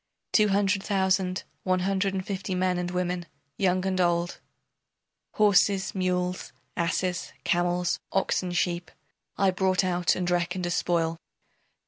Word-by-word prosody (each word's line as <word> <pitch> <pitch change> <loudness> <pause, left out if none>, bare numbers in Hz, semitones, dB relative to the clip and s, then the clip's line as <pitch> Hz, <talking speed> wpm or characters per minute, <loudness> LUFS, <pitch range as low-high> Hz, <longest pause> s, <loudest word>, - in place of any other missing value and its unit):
Two 215 -1 +5
hundred 200 0 +2
thousand, 190 -2 +1 0.2
one 185 -1 +1
hundred 195 +1 0
and 185 -1 -3
fifty 190 -1 -3
men 180 0 +1
and 175 0 -2
women, 180 -1 -2 0.3
young 185 -1 +1
and 185 -1 +1
old, 175 0 +1 0.9
Horses, 200 -2 +3
mules, 180 -1 -1 0.2
asses, 180 +1 -1
camels, 175 -1 +1
oxen, 185 -1 0
sheep, 175 0 -1 0.5
I 195 -1 +3
brought 185 0 +1
out 180 -2 +1
and 180 -1 -2
reckoned 175 +1 0
as 175 - -1
spoil. 165 -2 0
185 Hz, 130 wpm, -27 LUFS, 175-190 Hz, 0.9 s, Two